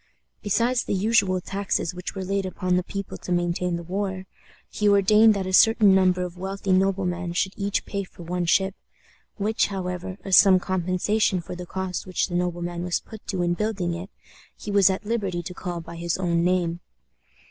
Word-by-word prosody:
Besides 235 +4 +1
the - - -2
usual 200 -2 +2
taxes 195 -3 -2
which 180 +2 -6
were 190 - -4
laid 195 +1 -1
upon 185 -1 -1
the 180 - +2
people 195 +2 -6
to - - -7
maintain 175 0 0
the 170 - -5
war, 190 +1 -3 0.4
he 210 -1 0
ordained 210 +2 +5
that 195 -1 -2
a 185 - -4
certain 220 -1 +6
number 185 -1 +3
of 180 0 -7
wealthy 195 +1 -3
noblemen 185 -2 +1
should 190 +2 0
each 200 0 -2
pay 200 -1 -3
for 180 -2 -13
one 175 +1 -2
ship, 190 +3 +2 0.6
which, 215 +2 +1
however, 185 -1 -5
as 195 -2 +4
some 190 -2 +7
compensation 185 +2 0
for 175 +1 -7
the 180 0 -8
cost 190 0 -4
which 185 - 0
the 175 - -3
nobleman 175 -1 -2
was 180 -1 0
put 220 -1 -13
to 185 -3 -1
in 175 0 +1
building 195 -3 -2
it, 175 +4 -6 0.5
he 210 - -6
was 200 -1 +5
at 190 +2 -2
liberty 200 -6 -2
to 180 - -7
call 175 -1 -5
by 165 +1 -10
his 170 0 -2
own 170 -2 +1
name. 175 -1 +1
185 Hz, 190 wpm, -24 LUFS, 175-200 Hz, 0.6 s, some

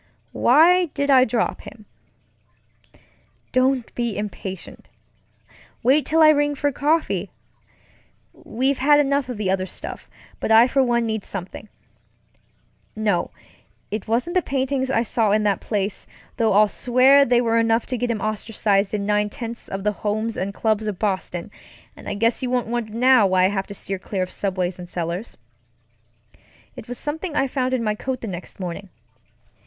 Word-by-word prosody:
Why 340 +8 +5
did 280 0 +1
I 260 -1 +6
drop 225 -1 -1
him? 215 0 -13 1.7
Don't 255 -1 +1
be 235 -3 -2
impatient. 195 -3 -7 0.9
Wait 275 +5 +3
till 320 +1 +4
I 310 - +8
ring 290 -1 +2
for 285 +1 0
coffee. 305 +4 0 1.0
We've 265 +4 -2
had 290 +2 +5
enough 280 -2 +1
of 245 - -4
the 200 -3 -1
other 190 -1 -1
stuff, - - -8 0.3
but - - -2
I 225 +2 +7
for 270 +1 +2
one 240 -2 +1
need 220 -2 -2
something. 195 +2 -7 1.3
NoŌĆöit 210 0 -4
wasn't 245 +10 0
the 365 - +4
paintings 265 -2 -1
I 235 -3 +2
saw 225 -2 +1
in 210 +1 +2
that 205 -2 +1
place; 200 -2 -3 0.3
though 225 -2 +1
I'll 210 +2 +5
swear 255 +5 +4
they 245 -2 +3
were 230 -1 +2
enough 225 0 +2
to 255 - -3
get 245 +1 -2
him 225 -3 -2
ostracized 210 -1 0
in 200 -1 -2
nine 210 0 +1
tenths 230 +2 -7
of 195 0 -5
the 210 - +2
homes 215 +2 -3
and 195 +2 -3
clubs 215 +1 -1
of 205 -3 -3
Boston, 185 -4 -3 0.4
and - - -9
I 205 - -3
guess 230 +3 +1
you 255 - -2
won't 250 -2 0
wonder 230 -1 -3
now 250 -2 +5
why 185 -1 +3
I - - +3
have 195 -1 -3
to 200 - -8
steer 195 0 -4
clear 185 0 -3
of 185 - -6
subways 185 -2 -2
and 175 -1 -9
cellars. 175 +5 -5 1.4
It - - -10
wasŌĆösomething 295 +7 -4
I 270 - +2
found 255 -1 -1
in 240 - -2
my 215 -1 0
coat 255 +4 -4
the 230 - -5
next 180 -1 -8
morning. 185 +2 -6
225 Hz, 170 wpm, -22 LUFS, 205-260 Hz, 1.7 s, I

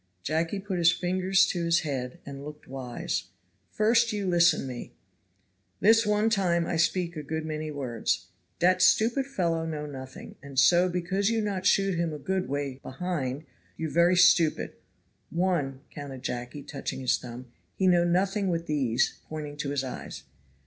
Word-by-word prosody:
Jacky 165 - -1
put 190 -2 -3
his 170 0 +6
finger 185 +1 -2
to 185 -2 +4
his 170 0 +3
head, 130 -5 -4
and 140 0 -8
looked 150 0 -10
wise. 125 -8 -4 0.4
"First 230 +2 +3
you 205 -2 -2
listen 170 -4 +4
me 125 -2 -7 0.9
this 225 +1 +5
one 210 +1 +2
time 175 -5 +2
I 170 - -2
speak 170 +1 +1
a 155 - -4
good 160 +2 -4
many 155 0 -4
words. 120 -8 -2 0.3
Dat 180 +2 +3
stupid 235 +8 +4
fellow 170 -10 0
know 155 -2 -4
nothing, 130 -3 -9
and 140 -1 -11
so 175 +7 +5
because 185 +3 0
you 230 -1 +1
not 200 -3 -1
shoot 195 -1 +3
him 170 -2 0
a - - -4
good 190 +2 -2
way* 140 -2 -3
behind 140 -2 -3 0.3
you 160 -2 -3
very 170 +2 +4
stupid. 170 -3 +4 0.6
One," 165 -7 -1
counted 140 -3 -8
Jacky, 125 +4 -5
touching 140 -2 -5
his 130 - +2
thumb, 125 0 -9 0.2
"he 190 - 0
know 175 -2 +5
nothing 190 +3 +1
with 170 -2 -1
these 135 -6 0
(pointing 150 -2 -5
to 145 -1 -3
his 140 -1 -1
eyes). 130 - -7
165 Hz, 165 wpm, -28 LUFS, 140-185 Hz, 0.9 s, his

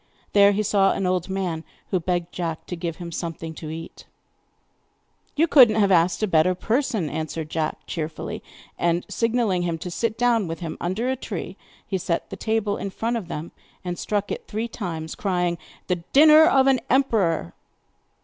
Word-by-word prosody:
There 200 0 +7
he 205 +1 0
saw 195 -1 +3
an 195 - -2
old 180 0 0
man, 180 -4 -2 0.3
who 185 - +2
begged 175 0 -2
Jack 165 -3 -4
to 180 - -5
give 165 -1 -4
him 170 -1 -7
something 165 -1 -5
to 155 0 -8
eat. 165 +1 -8 1.3
'You 310 +3 +4
could 265 -7 +8
not 215 0 0
have 200 -2 +3
asked 175 +3 +3
a - - +3
better 180 +1 +3
person,' 230 - 0
answered 155 +1 -4
Jack 160 -1 -2
cheerfully. 155 -1 -5 0.4
And 170 0 +1
signing 230 +1 0 0.2
to 175 - -1
him 165 -1 -1
to 175 +2 -6
sit 225 +4 -1
down 235 -4 +2
with 165 0 -5
him 165 -3 -5
under 190 +8 -1
a - - 0
tree, 195 -7 -6 0.3
he 190 - -2
set 170 -1 -2
the - - -4
table 215 0 -1
in 200 - -4
front 230 +5 -2
of 220 -7 -4
them, 165 0 -6 0.3
and 175 -1 -3
struck 205 -1 -2
it - - -5
three 220 +2 -3
times, 165 -8 -5
crying: 180 -3 -1 0.3
'The 180 - 0 0.2
dinner 310 +2 +8
of 270 -4 +4
an 270 -2 +4
emperor! 205 - +2
185 Hz, 190 wpm, -24 LUFS, 165-220 Hz, 1.3 s, could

